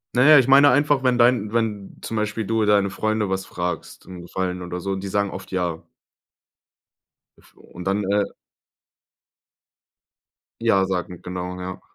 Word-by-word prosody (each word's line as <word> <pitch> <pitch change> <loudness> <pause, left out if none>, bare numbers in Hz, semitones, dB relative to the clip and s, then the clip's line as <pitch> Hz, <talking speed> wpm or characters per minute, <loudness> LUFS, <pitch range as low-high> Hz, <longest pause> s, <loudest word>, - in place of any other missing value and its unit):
Na 125 - +4
ja, 155 - +9
ich 130 -1 +4
meine 140 +1 +7
einfach, 145 +1 +3
wenn 125 -1 +2
dein 120 -3 +3
wenn 105 -4 -2
zum 115 - -4
Beispiel 105 0 -2
du 115 0 +1
deine 100 -1 +3
Freunde 110 0 -1
was 95 0 -2
fragst, 90 -1 -5
'n 90 -2 -10
Gefallen 90 +1 -4
oder 90 0 -5
so, 100 +2 -4
und 95 - -2
die 100 - -4
sagen 100 0 -1
oft 95 - -9
ja 90 -3 -2 1.6
F - - -24
und 90 - -12
dann, 100 +2 0
äh 100 +1 +1 2.4
ja 100 -5 +3
sagen, 90 -2 -4
genau, 90 0 -6
ja. 95 0 -7
100 Hz, 160 wpm, -22 LUFS, 90-115 Hz, 2.4 s, ja